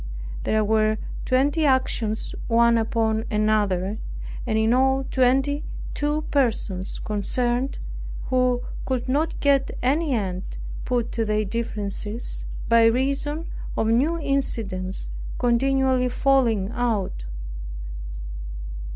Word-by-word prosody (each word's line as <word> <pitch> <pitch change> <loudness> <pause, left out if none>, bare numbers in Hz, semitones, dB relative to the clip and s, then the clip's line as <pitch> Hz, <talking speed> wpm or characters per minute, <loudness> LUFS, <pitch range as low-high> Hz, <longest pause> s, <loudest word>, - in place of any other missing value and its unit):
There 215 0 +2
were 215 0 +3 0.3
twenty 280 +5 +2
actions 255 -5 +1
one 235 0 +5
upon 220 -1 +1
another, 210 -2 +1 0.5
and 220 -2 +1
in 220 +1 +3
all 265 +1 +3
twenty 270 +3 +2 0.3
two 295 +1 0
persons 220 -8 0
concerned, 240 +5 -1 0.5
who 250 -1 +2 0.2
could 260 -2 -1
not 295 +5 0
get 280 -1 +3
any 285 +2 +2
end 185 -4 -3 0.3
put 245 -2 0
to 230 - 0
their 215 0 +1
differences, 215 0 -1 0.2
by 230 0 +6
reason 275 +6 +1 0.3
of 220 - +2
new 280 +9 +3
incidents 215 - -1 0.3
continually 255 +1 +2
falling 240 -7 +2
out. 215 - -1
240 Hz, 100 wpm, -24 LUFS, 215-270 Hz, 0.5 s, by